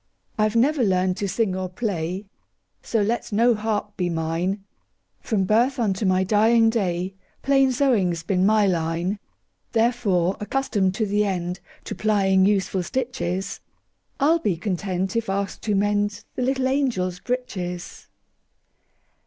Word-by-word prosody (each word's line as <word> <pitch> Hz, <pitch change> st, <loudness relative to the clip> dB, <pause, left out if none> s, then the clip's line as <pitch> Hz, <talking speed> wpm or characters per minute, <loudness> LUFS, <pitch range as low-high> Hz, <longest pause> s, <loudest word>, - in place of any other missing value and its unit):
I 215 Hz, 0 st, +2 dB
've 215 Hz, -, -9 dB
never 270 Hz, +3 st, +3 dB
learned 185 Hz, -2 st, +1 dB
to 200 Hz, -, -2 dB
sing 195 Hz, 0 st, 0 dB
or 185 Hz, -1 st, -3 dB
play, 185 Hz, -2 st, -3 dB, 0.6 s
So 225 Hz, -3 st, 0 dB
let 230 Hz, +3 st, -2 dB
no 235 Hz, +4 st, +4 dB
harp 210 Hz, -1 st, -2 dB
be 180 Hz, -1 st, 0 dB
mine; 170 Hz, +4 st, -2 dB, 0.6 s
From 210 Hz, -5 st, 0 dB
birth 235 Hz, +8 st, +2 dB
unto 205 Hz, -4 st, 0 dB
my 185 Hz, 0 st, +3 dB
dying 225 Hz, +3 st, +4 dB
day, 185 Hz, -4 st, -1 dB, 0.3 s
Plain 270 Hz, -1 st, +4 dB
sewing 245 Hz, -9 st, +2 dB
's 165 Hz, -, -7 dB
been 185 Hz, +1 st, +1 dB
my 210 Hz, +1 st, +4 dB
line. 175 Hz, +2 st, -1 dB, 0.5 s
Therefore, 220 Hz, -6 st, +1 dB
accustomed 210 Hz, -5 st, 0 dB
to 220 Hz, -, 0 dB
the 205 Hz, +1 st, +1 dB
endTo 180 Hz, -2 st, -4 dB
plying 195 Hz, -1 st, +3 dB
useful 195 Hz, -2 st, +1 dB
stitches,I 235 Hz, +3 st, -4 dB
'll 335 Hz, -, +3 dB
be 200 Hz, -, 0 dB
content 185 Hz, +1 st, -2 dB
if 230 Hz, -3 st, -1 dB
asked 195 Hz, 0 st, -2 dB
to 210 Hz, -2 st, +1 dB
mendThe 205 Hz, +1 st, 0 dB
little 260 Hz, +1 st, +1 dB
angels' 235 Hz, -10 st, 0 dB
breeches. 185 Hz, -8 st, -5 dB
205 Hz, 135 wpm, -23 LUFS, 185-230 Hz, 0.6 s, no